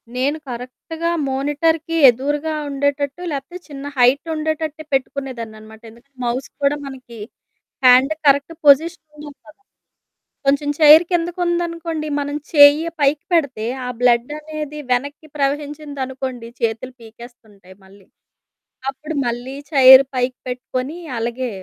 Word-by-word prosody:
నేను 275 +4 0
కరెక్ట్‌గా 255 +7 -5 0.2
మానిటర్‌కి 300 +4 -1
ఎదురుగా 290 +6 -1 0.2
ఉండేటట్టు 285 +2 -2
లేకపోతే 295 +5 -6
చిన్న 280 -3 -9
హైట్ 255 +5 +3
ఉండేటట్టే 310 0 -3
పెట్టుకునేదాన్నన్నమాట. 230 -5 -4
ఎందుకంటే, 235 +5 -20
మౌస్ 245 +2 -2
కూడా 280 +1 +2
మనకి 255 -3 -10 0.7
హ్యాండ్ 255 +3 +6
కరెక్ట్ 280 +3 +3
పొజిషన్ 315 +3 +4
ఉండాలి 295 -1 -11
కదా! 305 - -17 0.9
కొంచెం 285 +1 +2
చైర్ 310 +2 +8
కిందకు 345 +1 -1
ఉందనుకోండి, 335 -2 -2
మనం 285 0 -3 0.2
చెయ్య 295 +2 +7
పైకి 285 +1 +1
పెడితే 280 -10 0 0.2
ఆ - - -3
బ్లడ్ 245 +2 +2
అనేది 305 -1 -7
వెనక్కి 285 +5 -2
ప్రవహించింది 290 0 -3
అనుకోండి, 255 -3 -6
చేతులు 230 +2 -2
పీకేస్తుంటాయి 220 -4 -15
మళ్ళీ. 195 0 -19 0.8
అప్పుడు 300 +4 -7
మళ్ళీ 245 +3 -4 0.2
చైర్ 265 -2 +9
పైకి 250 0 -1
పెట్టుకొని 255 +3 -4 0.2
అలాగే 240 +2 -3
275 Hz, 115 wpm, -19 LUFS, 250-305 Hz, 0.9 s, చైర్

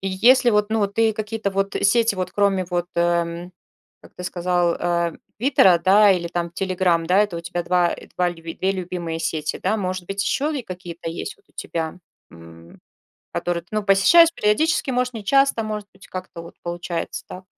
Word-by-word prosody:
если 225 +7 +4
вот, 210 -1 +1
ну, 225 - +1
вот 200 -1 -1
ты 225 0 +3
какие-то 215 -1 -3
вот 195 +1 -1
сети 225 +1 +3
вот 185 -1 -3
кроме 200 -2 +1
вот, 175 -1 -2
э, 170 - +1
м, 170 +1 -1 0.5
как - - -18
ты - - -8
сказал, 175 -1 0
а, 170 -1 0 0.3
"Твиттера", 210 -8 +5
да, 200 +4 +5
или 175 -2 -2
там 170 0 -3
"Телеграм", 180 -2 0
да, 180 +3 +3
это 205 -4 +1
у - - -4
тебя 170 +1 -4
2, 175 0 +2
э, - - -9
2 180 -1 +2
люб 165 -1 -8
2 190 +1 +1
любимые 175 -3 -4
сети, 155 -2 -2
да? 220 - +1
Может 185 -3 -3
быть, 195 +1 -2
еще 295 +8 -1
и - - -5
какие-то 175 -4 -7
есть 170 - -6
вот 410 - -32
у - - -30
тебя, 165 +1 -4 0.3
м, 85 0 -15 0.5
которые 175 -1 -2
ты, 175 - -33
ну, 215 0 0
посещаешь 210 - +6
периодически, 265 +7 +1
может, 250 0 -1
нечасто, 235 +3 +2
может 210 -1 -5
быть, 195 - -17
как-то 185 -2 -8
вот 170 - -12
получается, 175 0 -4
так? 185 - -10
185 Hz, 195 wpm, -22 LUFS, 170-210 Hz, 0.5 s, посещаешь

